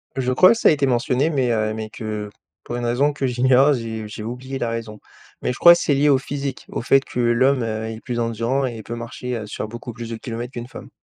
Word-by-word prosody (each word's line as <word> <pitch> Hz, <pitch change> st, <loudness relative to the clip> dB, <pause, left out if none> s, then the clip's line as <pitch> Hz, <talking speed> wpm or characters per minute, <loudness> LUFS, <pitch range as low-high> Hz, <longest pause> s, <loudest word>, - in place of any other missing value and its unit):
Je 130 Hz, -1 st, 0 dB
crois 185 Hz, +9 st, +7 dB
que -, -, -4 dB
ça -, -, +5 dB
a -, -, +6 dB
été 145 Hz, -3 st, +1 dB
mentionné 125 Hz, +4 st, +1 dB
mais, 130 Hz, -6 st, +1 dB
heu, 110 Hz, -1 st, 0 dB
mais 110 Hz, 0 st, -5 dB
que 105 Hz, -1 st, -5 dB, 0.3 s
pour 120 Hz, -, -5 dB
une 120 Hz, 0 st, -3 dB
raison 135 Hz, +5 st, +2 dB
que 140 Hz, -2 st, -1 dB
j'ignore 130 Hz, +3 st, +4 dB
j'ai 115 Hz, -3 st, -4 dB
j'ai 105 Hz, 0 st, -8 dB
oublié 125 Hz, +4 st, -5 dB
la 120 Hz, -3 st, -2 dB
raison, 115 Hz, -2 st, -5 dB, 0.4 s
mais -, -, 0 dB
je -, -, -9 dB
crois 170 Hz, 0 st, +9 dB
c'est 150 Hz, -, +1 dB
lié 145 Hz, +2 st, +3 dB
au 140 Hz, -, +5 dB
physique 140 Hz, 0 st, -5 dB
au -, -, -4 dB
fait 135 Hz, +3 st, +4 dB
que -, -, -5 dB
l'homme, 125 Hz, +3 st, +3 dB
heu, 110 Hz, -1 st, -3 dB
est 110 Hz, 0 st, -6 dB
plus 120 Hz, -2 st, -4 dB
endurant 115 Hz, +4 st, 0 dB
et 120 Hz, -2 st, -4 dB
il 110 Hz, -, -9 dB
peut, 115 Hz, -, -6 dB
heu, -, -, -3 dB
marcher 120 Hz, 0 st, -5 dB
sur 105 Hz, +1 st, -5 dB
beaucoup 120 Hz, +2 st, -8 dB
plus 115 Hz, 0 st, -7 dB
de 115 Hz, -, -4 dB
kilomètres 120 Hz, +2 st, -6 dB
qu'une 120 Hz, -1 st, -6 dB
femme. -, -, -11 dB
120 Hz, 260 wpm, -21 LUFS, 115-135 Hz, 0.4 s, crois